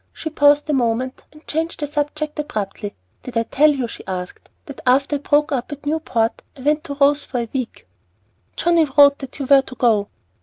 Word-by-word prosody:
She 315 - -6
paused 290 -1 +4
a 300 - 0
moment, 255 0 -1
and 305 +1 -18
changed 325 +2 -2
the 295 - -1
subject 295 +1 -3
abruptly. 210 -7 -4 0.3
"Did 245 -2 -6
I 230 - +2
tell 295 +6 +3
you," 270 -5 -1
she - - -9
asked, 180 -1 -6 0.2
"that 280 - -10
after 275 +3 +2
I - - -11
broke 295 +2 +2
up 260 0 -2
at 290 0 -8
Newport 260 -7 -1 0.2
I - - -11
went 300 +3 +1
to 285 -3 -5
Rose 285 +1 +3
for 255 - -5
a 230 - -6
week?" 255 -4 -5 0.7
"Johnnie 340 -2 +3
wrote 285 -1 +7
that 270 -2 -9
you 280 - -3
were 275 +1 +6
to 265 -1 -11
go." 220 -5 +2
280 Hz, 205 wpm, -20 LUFS, 250-295 Hz, 0.7 s, wrote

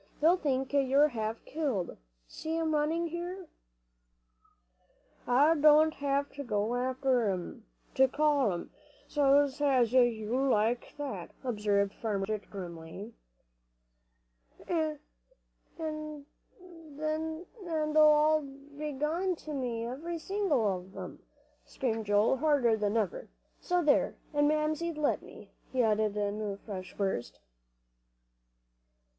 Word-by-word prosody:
They'll 325 +4 +5
think 270 -5 -1
you're 280 +1 +4
half 220 -2 -4
killed. 270 - -2 0.3
See 320 +1 -4
'em 320 -1 0
running 310 +3 +1
here." 350 +3 -5 1.8
"I 275 +6 +5
don't 310 0 +5
have 280 0 -1
to 285 - -6
go 215 -2 -1
after 255 -2 +1
'em, 180 - -5 0.3
to 265 - +5
call 285 -4 +2
'em, 175 - -5 0.4
s'long 285 0 +4
as 255 -5 +3
you 255 - +7
yell 240 +3 +1
like 230 +1 +1
that," 260 -12 -5
observed 205 -4 0
Farmer 205 -4 -2
Blodgett, 210 0 -4
grimly. 180 +3 -8 1.5
"An' 315 -3 0 0.8
they 315 - -5
all 305 0 +6
b'long 295 +5 -3
to 310 -1 -8
me, 240 -4 -2
every 315 +8 -4
single 375 - 0
one 195 -2 +2
of 190 +2 -14
'em," 185 -2 -8 0.4
screamed 225 -4 -3
Joel, 205 +5 +3
harder 280 -6 +3
than 210 0 0
ever, - - -2 0.3
"so 360 -1 0
there! 295 -2 +3 0.2
an' 290 0 +3
Mamsie'd 310 +2 0
let 300 -1 +1
me," - - -14 0.2
he 255 -2 +2
added 215 -1 +1
in 205 +1 -1
a 205 -2 -3
fresh 190 -3 -8
burst. 195 -12 -2
275 Hz, 115 wpm, -30 LUFS, 220-310 Hz, 1.8 s, you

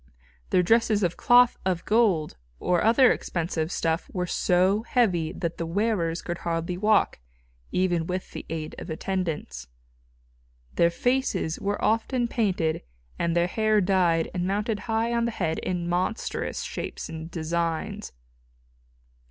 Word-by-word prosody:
Their 180 - +3
dresses 220 +1 +3
of 175 -1 +1
cloth 245 0 +5
of 185 -2 -1
gold 210 -9 +2 0.2
or 175 -1 +1
other 235 +3 +6
expensive 165 -1 -2
stuff 165 -1 -1
were 180 -1 -2
so 185 +3 +2
heavy 190 -10 +1
that 170 -1 -4
the 165 - -1
wearers 175 -3 0
could 175 -1 -4
hardly 170 +1 -2
walk, 210 - +2 0.5
even 175 -3 +1
with 185 +1 -4
the - - -7
aid 155 -1 -4
of - - -8
attendants. 160 - -3 1.1
Their 170 - +4
faces 210 -5 0
were 205 +1 -2
often 235 +2 +1
painted 185 -9 0 0.4
and 170 0 0
their 170 0 +3
hair 215 +3 +2
dyed 180 -4 +2
and 180 0 -1
mounted 210 +2 -1
high 225 +1 +1
on 235 0 +1
the - - 0
head 170 -8 -2
in 175 -2 -2
monstrous 180 +6 -2
shapes - - -5
and 160 0 -7
designs. 165 0 -2
180 Hz, 140 wpm, -26 LUFS, 165-215 Hz, 1.1 s, other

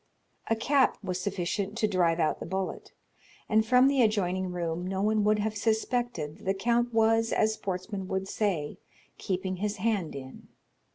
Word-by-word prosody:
A 225 - +3
cap 265 +4 +2
was 185 -1 -3
sufficient 200 +2 -2
to 220 - +2
drive 175 -4 +2
out 155 - +1
the - - -6
bullet, 190 0 -4 0.6
and 220 0 +3
from 250 +4 +5
the 275 -1 +3
adjoining 185 -4 +1
room 175 0 -3
no 190 0 -2
one 215 0 +2
would 215 0 +4
have 215 +1 -1
suspected 220 -7 -1
that - - -15
the 195 +1 +1
count 235 +4 +1
was, 225 0 +3
as 220 0 +2
sportsmen 190 -1 -4
would 190 0 -2
say, 185 -9 -2 0.4
keeping 185 0 -2
his 205 +2 -2
hand 205 -5 -1
in. 130 -1 -9
200 Hz, 170 wpm, -28 LUFS, 185-220 Hz, 0.6 s, from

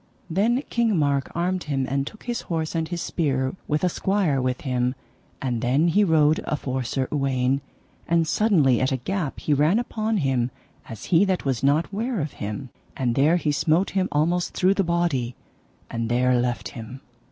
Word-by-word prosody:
Then 230 - +2
King 230 -5 +2
Mark 140 -3 +1
armed 180 +2 -1
him, 135 -3 -1
and 135 +1 -1
took 215 - -10
his 240 -1 -3
horse 160 -2 -1
and 165 -1 -1
his 170 +1 -4
spear, 130 -4 -1
with 150 +2 0
a - - +4
squire 180 -7 +1
with 125 0 -1
him. 125 -1 0 0.4
And 125 -4 -2
then 135 +7 +2
he 205 +5 +4
rode 155 -4 +4
afore 130 -3 -2
Sir 130 +2 -2
Uwaine, 135 -1 +1 0.5
and 165 -1 +2
suddenly 155 - +3
at 130 - +1
a 135 - +1
gap 170 +2 -3
he 150 - +1
ran 150 +8 +3
upon 225 -2 -1
him 130 -7 +1 0.4
as 110 -2 -8
he 170 +3 +6
that 190 -5 -1
was 130 -4 0
not 145 +7 +2
ware 230 +2 -1
of 150 -2 -3
him, 105 +6 -5 0.3
and 125 -3 0
there 145 +7 +4
he 155 -3 0
smote 160 +5 +1
him 190 -1 0
almost 170 +4 0
through 185 +1 +3
the 200 - +1
body, 170 -9 0 0.5
and 115 0 -3
there 125 +1 +3
left 120 -1 -2
him. 120 +3 -9
150 Hz, 185 wpm, -24 LUFS, 130-180 Hz, 0.5 s, he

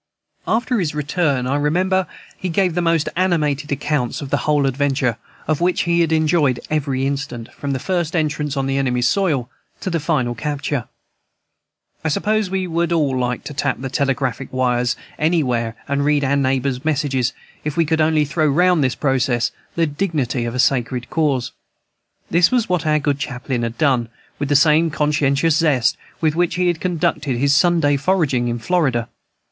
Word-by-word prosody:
After 240 +1 +1
his 155 -5 -2
return, 145 -3 0
I 130 +2 0
remember, 180 +5 +1 0.3
he 185 - -4
gave 180 +1 +1
the 175 - 0
most 165 -2 +1
animated 150 -5 0
accounts 140 -3 -1
of 140 -2 -7
the 145 - +3
whole 145 -2 +3
adventure, 135 -3 0 0.3
of 155 +1 0
which 180 +1 +2
he 170 0 +2
had 165 -1 +1
enjoyed 155 -5 +2
every 135 -3 0
instant, 135 -4 -4
from 140 - -6
the - - -1
first 175 +2 -2
entrance 150 -3 -1
on 135 - 0
the 135 0 0
enemy's 125 -2 +1
soil 150 -8 +1 0.3
to 190 - -3
the 165 - 0
final 145 -6 0
capture. 145 -1 -3 1.2
I - - 0
suppose 210 +6 0
we 190 0 -1
should 170 0 -1
all 150 -6 +1
like 125 -1 -1
to - - -7
tap 145 0 -1
the 130 0 -5
telegraphic 135 -2 -1
wires 125 -1 +1 0.2
anywhere 125 -8 +1
and 140 0 0
read 145 0 +2
our 140 +1 +2
neighbor's 135 -1 0
messages, 140 -5 0 0.3
if 150 0 -4
we 165 - +3
could 160 +1 +1
only 155 -1 +3
throw 155 +2 0
round 175 +2 +3
this 130 -2 0
process 125 -3 +1 0.2
the 165 - +2
dignity 145 -7 -1
of 120 +1 -4
a - - -3
Sacred 125 -2 0
Cause. 145 -6 0 0.8
This 170 +1 +5
was 245 -3 +1
what 180 -4 0
our 155 0 +3
good 145 -1 0
chaplain 125 -2 -3
had 115 0 -3
done, 130 -6 +2 0.3
with 145 -1 -2
the 145 - +2
same 155 +3 +4
conscientious 150 +1 +1
zest 145 -8 +2 0.3
with 155 -1 +1
which 175 0 +1
he 180 0 +2
had 170 -2 -2
conducted 155 -7 -1
his 140 +2 +3
Sunday 165 -3 +3
foraging 140 -6 +1
in 120 0 -1
Florida. 120 -3 0
145 Hz, 180 wpm, -20 LUFS, 130-165 Hz, 1.2 s, This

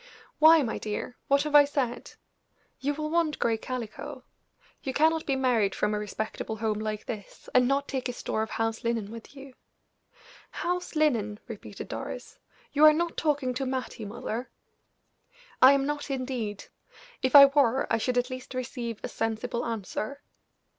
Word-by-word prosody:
"Why, 315 0 +8
my 230 - -3
dear? 215 +3 -4
What 280 +1 +3
have 300 -1 -4
I 295 0 +9
said? 275 -4 -3 0.7
You 285 +2 -1
will 305 +1 -3
want 330 -3 +1
gray 230 - +1
calico. 230 -1 -6 0.6
You 265 - -3
cannot 320 +1 +3
be 275 - +2
married 235 -7 +2
from 210 0 0
a 210 - 0
respectable 215 +1 -4
home 215 -1 -1
like 215 -1 -4
this, 210 -4 -8
and 250 -1 +5
not 275 +1 +1
take 260 -1 -3
a - - -3
store 220 - -2
of 220 - -2
house 225 0 -2
linen 230 -3 -1
with 230 +4 -11
you." 270 -1 -11 1.0
"House 355 0 -3
linen!" 230 -9 +1
repeated 225 -4 -8
Doris. - - -7 0.3
"You 295 - +3
are 305 - +9
not 340 +2 -1
talking 285 -5 0
to 265 +2 -2
Mattie, 255 -4 -4
mother." 235 +3 -5 1.1
"I 260 +2 +9
am 275 -1 +1
not, 295 0 -3
indeed; 250 -6 -3 0.6
if 260 +1 +1
I 280 -1 +13
were, 275 -2 +3
I 225 - +3
should 250 +3 0
at 250 +1 +1
least 255 0 -7
receive 240 -3 -4
a - - -2
sensible 225 +2 -2
answer. 230 +5 -4
255 Hz, 165 wpm, -28 LUFS, 225-280 Hz, 1.1 s, I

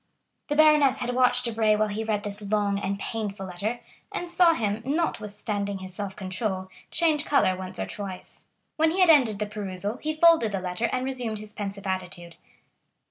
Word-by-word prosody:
'" - - -51
The 295 - 0
baroness 300 -3 +5
had 245 0 -2
watched 250 0 +3
Debray 220 -2 +2
while 215 0 +1
he 210 +2 -3
read 215 -2 -1
this 205 0 -5
long 205 -1 0
and 200 0 -2
painful 205 -2 -4
letter, 200 +6 -3 0.3
and 350 - -4
saw 345 -1 +4
him, 215 -1 -1
notwithstanding 210 -9 -2
his 185 -1 -8
self 195 0 -5
control, 190 0 -3 0.2
change 320 -3 +2
color 185 -10 +2
once 185 0 -6
or 95 - -2
twice. 190 - -8 0.3
When 320 +1 +4
he 365 +4 +1
had 355 -3 +8
ended 245 -9 +4
the 210 - -1
perusal, 205 +1 -3
he 310 +2 -3
folded 315 -9 +5
the 195 - 0
letter 180 +4 -2
and 255 0 -1
resumed 250 -5 -3
his 210 0 -8
pensive 200 -1 -6
attitude. 180 -2 -5
210 Hz, 190 wpm, -26 LUFS, 195-255 Hz, 0.3 s, had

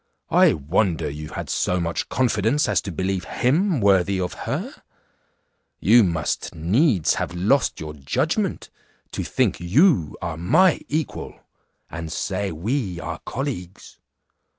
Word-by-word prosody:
I - - +5
wonder 80 +4 0
you 75 +1 -7
had - - -6
so 90 - 0
much 85 -1 -2
confidence 120 +3 +1
as - - +2
to 100 - -6
believe 95 +2 -2
him 160 +6 +1
worthy 100 -2 +3
of 90 -1 -2 0.2
her; - - -3 1.1
you 115 +6 +6
must 80 -5 -2
needs 95 - +2
have - - -3
lost 105 +10 +1
your 75 -1 -6
judgment 70 -3 -2 0.4
to - - -3
think - - 0
you 95 - +3
are 80 -2 -4
my 160 - +3
equal, 155 +1 -3 0.5
and 80 -1 -6
say 95 +2 -2
we 95 - -2
are 80 -1 -5
colleagues. 120 -10 -6
95 Hz, 130 wpm, -23 LUFS, 85-125 Hz, 1.1 s, you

